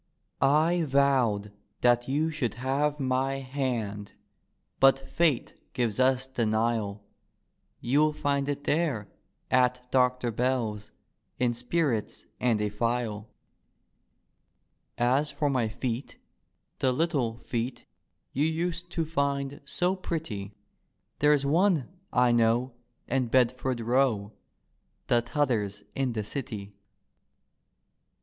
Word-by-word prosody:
" -, -, -43 dB, 0.3 s
I 175 Hz, 0 st, +1 dB
vowed 130 Hz, -7 st, +2 dB, 0.3 s
that 120 Hz, 0 st, +3 dB
you 150 Hz, +4 st, +1 dB
should 130 Hz, -9 st, -2 dB
have 140 Hz, +4 st, 0 dB
my 135 Hz, 0 st, 0 dB
hand, 125 Hz, -7 st, -3 dB, 0.7 s
But 135 Hz, 0 st, +6 dB
Fate 160 Hz, -8 st, +1 dB, 0.2 s
gives 120 Hz, -4 st, -1 dB
us 130 Hz, 0 st, +3 dB
denial; 110 Hz, -4 st, -1 dB, 0.8 s
You'll 150 Hz, +5 st, +3 dB
find 140 Hz, -1 st, -1 dB
it 145 Hz, 0 st, -3 dB
there, 145 Hz, -, 0 dB, 0.4 s
at 125 Hz, 0 st, +3 dB
Doctor 125 Hz, -2 st, +2 dB
Bell's, 115 Hz, -3 st, -1 dB, 0.5 s
In 125 Hz, -1 st, +1 dB
spirits 120 Hz, -1 st, -1 dB
and 120 Hz, -4 st, +2 dB
a 105 Hz, -, 0 dB
phial. 115 Hz, -1 st, -2 dB, 0.9 s
" -, -, -48 dB, 0.2 s
As 150 Hz, +1 st, -1 dB
for 145 Hz, -2 st, 0 dB
my 125 Hz, -4 st, +1 dB
feet, 120 Hz, +3 st, -4 dB, 0.6 s
the 130 Hz, -, +2 dB
little 130 Hz, -6 st, 0 dB
feet 120 Hz, +1 st, -4 dB, 0.5 s
You 145 Hz, +3 st, +2 dB
used 170 Hz, +2 st, -2 dB
to 165 Hz, -, 0 dB
find 140 Hz, -2 st, -1 dB
so 180 Hz, +6 st, 0 dB
pretty. 125 Hz, -, -5 dB, 0.6 s
There's 150 Hz, -1 st, +4 dB
one, 165 Hz, -1 st, +3 dB, 0.2 s
I 125 Hz, -1 st, +4 dB
know, 120 Hz, +2 st, +2 dB, 0.3 s
in 130 Hz, -1 st, 0 dB
Bedford 125 Hz, +1 st, +1 dB
Row, 115 Hz, -3 st, +1 dB, 0.7 s
The 120 Hz, -, +3 dB
T'other's 115 Hz, -6 st, -1 dB
in 135 Hz, -3 st, -1 dB
the 110 Hz, -2 st, -2 dB
City. 105 Hz, -4 st, -6 dB
130 Hz, 110 wpm, -28 LUFS, 115-140 Hz, 0.9 s, But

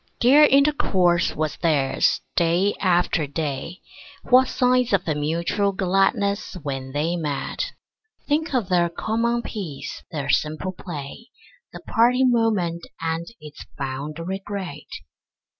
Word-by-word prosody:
Dear 280 Hz, +5 st, +7 dB
intercourse 215 Hz, -12 st, +3 dB
was 155 Hz, -1 st, -2 dB
theirs, 150 Hz, -5 st, +1 dB
day 175 Hz, +4 st, +2 dB
after 175 Hz, -4 st, +1 dB
day; 150 Hz, +4 st, -4 dB, 0.5 s
What 255 Hz, +1 st, +7 dB
signs 250 Hz, -2 st, +2 dB
of 190 Hz, -2 st, +2 dB
mutual 170 Hz, +7 st, 0 dB
gladness 195 Hz, +2 st, 0 dB
when 135 Hz, -2 st, -4 dB
they 155 Hz, +5 st, -1 dB
met! 150 Hz, -5 st, -3 dB, 0.5 s
Think 310 Hz, +3 st, 0 dB
of 235 Hz, -7 st, 0 dB
their 175 Hz, -2 st, +3 dB
common 230 Hz, +6 st, -1 dB
peace, 175 Hz, -11 st, -6 dB
their 145 Hz, -4 st, -4 dB
simple 155 Hz, +5 st, -1 dB
play, 170 Hz, -, -8 dB, 0.4 s
The -, -, -10 dB
parting 250 Hz, +3 st, +3 dB
moment 195 Hz, -8 st, 0 dB
and 165 Hz, +1 st, -2 dB
its 150 Hz, -1 st, -11 dB
fond 140 Hz, +2 st, -4 dB
regret. 190 Hz, -3 st, -5 dB
175 Hz, 115 wpm, -23 LUFS, 155-220 Hz, 0.5 s, Dear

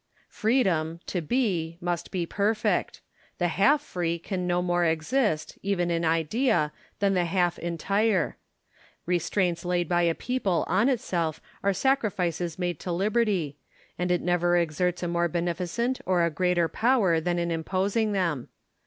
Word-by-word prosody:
Freedom, 185 Hz, -9 st, +1 dB
to 180 Hz, -, -2 dB
be, 170 Hz, -, -1 dB
must 175 Hz, -1 st, -3 dB
be 180 Hz, -3 st, -2 dB
perfect: 210 Hz, +5 st, 0 dB, 0.4 s
the 175 Hz, -1 st, +1 dB
half 280 Hz, -, +3 dB
free 170 Hz, -, -2 dB
can 180 Hz, +1 st, -4 dB
no 175 Hz, 0 st, +2 dB
more 175 Hz, 0 st, +1 dB
exist, 160 Hz, -, 0 dB
even 180 Hz, -3 st, 0 dB
in 170 Hz, 0 st, 0 dB
idea, 165 Hz, -, +1 dB, 0.3 s
than 200 Hz, -1 st, +2 dB
the 180 Hz, -2 st, +2 dB
half 175 Hz, 0 st, +1 dB
entire. 190 Hz, +2 st, 0 dB, 0.7 s
Restraints 175 Hz, 0 st, 0 dB
laid 175 Hz, -1 st, 0 dB
by 175 Hz, +1 st, +2 dB
a 170 Hz, -1 st, +2 dB
people 225 Hz, -9 st, -1 dB
on 200 Hz, +9 st, +3 dB
itself 175 Hz, -, -1 dB, 0.2 s
are 200 Hz, -, +3 dB
sacrifices 180 Hz, -, 0 dB
made 175 Hz, -3 st, -2 dB
to 180 Hz, -, -4 dB
liberty; 195 Hz, -5 st, 0 dB, 0.4 s
and 180 Hz, 0 st, -2 dB
it 180 Hz, -1 st, +2 dB
never 175 Hz, 0 st, +2 dB
exerts 175 Hz, +2 st, 0 dB
a -, -, 0 dB
more 170 Hz, 0 st, +1 dB
beneficent 175 Hz, +9 st, -2 dB
or 180 Hz, -2 st, +3 dB
a 170 Hz, -, 0 dB
greater 180 Hz, 0 st, +1 dB
power 205 Hz, -, +2 dB
than 175 Hz, +2 st, -1 dB
in 170 Hz, 0 st, -1 dB
imposing 195 Hz, +6 st, 0 dB
them. 170 Hz, -10 st, -1 dB
175 Hz, 150 wpm, -27 LUFS, 170-200 Hz, 0.7 s, half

